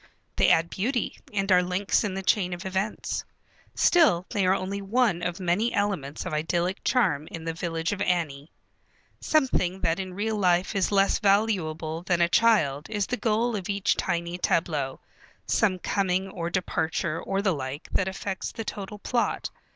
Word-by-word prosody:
They -, -, +4 dB
add 165 Hz, +1 st, +3 dB
beauty, 240 Hz, +4 st, -2 dB
and 195 Hz, -2 st, -1 dB
are 180 Hz, -1 st, +6 dB
links 180 Hz, +2 st, +1 dB
in 200 Hz, -3 st, -2 dB
the 195 Hz, -, -4 dB
chain 185 Hz, -2 st, +2 dB
of 175 Hz, +2 st, -7 dB
events. 190 Hz, +3 st, -2 dB, 0.5 s
Still 295 Hz, -, +4 dB
they 195 Hz, -3 st, +1 dB
are 185 Hz, -, +4 dB
only 195 Hz, +1 st, -3 dB
one 205 Hz, -3 st, +1 dB
of 175 Hz, +1 st, -3 dB
many 185 Hz, +6 st, +1 dB
elements 190 Hz, -9 st, -2 dB
of -, -, -4 dB
idyllic 170 Hz, +4 st, -1 dB
charm 175 Hz, -, +1 dB
in 165 Hz, -1 st, -7 dB
the 165 Hz, -, -2 dB
village 165 Hz, 0 st, -2 dB
of 205 Hz, -1 st, -3 dB
Annie. 160 Hz, -6 st, -1 dB, 0.7 s
Something 225 Hz, -, +1 dB
that 165 Hz, +1 st, +1 dB
in 185 Hz, -1 st, -5 dB
real 215 Hz, +2 st, -1 dB
life 180 Hz, -1 st, +2 dB
is 195 Hz, 0 st, +1 dB
less 195 Hz, -1 st, +3 dB
valuable 175 Hz, -6 st, +1 dB
than 175 Hz, -1 st, 0 dB
a 170 Hz, -, +4 dB
child 170 Hz, -10 st, +3 dB
is 205 Hz, -2 st, 0 dB
the 250 Hz, -, -2 dB
goal 230 Hz, 0 st, 0 dB
of 195 Hz, -1 st, -5 dB
each 200 Hz, -1 st, +1 dB
tiny 170 Hz, +1 st, -2 dB
tableau, 150 Hz, -7 st, 0 dB, 0.5 s
some 200 Hz, -5 st, +2 dB
coming 190 Hz, 0 st, 0 dB
or 170 Hz, -3 st, -4 dB
departure 165 Hz, -2 st, -1 dB
or 195 Hz, +1 st, -2 dB
the 190 Hz, -3 st, +2 dB
like 140 Hz, +1 st, -5 dB
that 195 Hz, -, +1 dB
affects 190 Hz, 0 st, -4 dB
the 225 Hz, -, -6 dB
total 205 Hz, 0 st, -6 dB
plot. 235 Hz, +3 st, -1 dB
185 Hz, 175 wpm, -26 LUFS, 170-205 Hz, 0.7 s, are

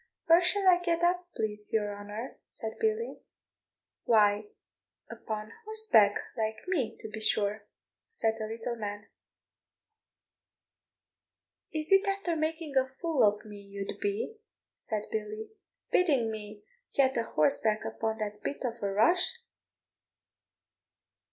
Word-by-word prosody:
"Where 335 Hz, +2 st, +7 dB
shall 390 Hz, +2 st, +2 dB
I 355 Hz, -1 st, +7 dB
get 345 Hz, -1 st, 0 dB
up, 355 Hz, 0 st, +2 dB
please 210 Hz, -1 st, -1 dB
your 205 Hz, -2 st, 0 dB
honour?" 205 Hz, +4 st, -7 dB
said 220 Hz, -, -4 dB
Billy. 445 Hz, +1 st, 0 dB, 0.9 s
"Why, 210 Hz, -2 st, +4 dB, 0.6 s
upon 215 Hz, -1 st, -5 dB
horseback, 430 Hz, -, +4 dB, 0.2 s
like 220 Hz, +2 st, -3 dB
me, 300 Hz, -, 0 dB
to -, -, -6 dB
be 220 Hz, 0 st, -6 dB
sure," 210 Hz, -1 st, 0 dB, 0.4 s
said 225 Hz, -, 0 dB
the 215 Hz, -, -3 dB
little 230 Hz, +2 st, -4 dB
man. 205 Hz, -1 st, -5 dB, 2.6 s
"Is 310 Hz, +1 st, -3 dB
it 390 Hz, +1 st, +6 dB
after 390 Hz, -4 st, 0 dB
making 315 Hz, -1 st, -2 dB
a 260 Hz, 0 st, +4 dB
fool 280 Hz, +2 st, -1 dB
of 210 Hz, 0 st, +3 dB
me 210 Hz, -1 st, -9 dB
you'd 200 Hz, 0 st, -6 dB
be," 410 Hz, +3 st, -2 dB, 0.4 s
said 215 Hz, -1 st, -3 dB
Billy, 215 Hz, 0 st, -4 dB, 0.4 s
"bidding 275 Hz, -11 st, +3 dB
me 210 Hz, -1 st, -8 dB, 0.3 s
get 265 Hz, -1 st, +4 dB
a 230 Hz, -, +2 dB
horseback 215 Hz, +5 st, +2 dB
upon 220 Hz, 0 st, -2 dB
that 210 Hz, -1 st, -4 dB
bit 285 Hz, -, -4 dB
of 235 Hz, -1 st, -3 dB
a 200 Hz, -1 st, 0 dB
rush? 345 Hz, -, +3 dB
225 Hz, 125 wpm, -30 LUFS, 210-340 Hz, 2.6 s, Where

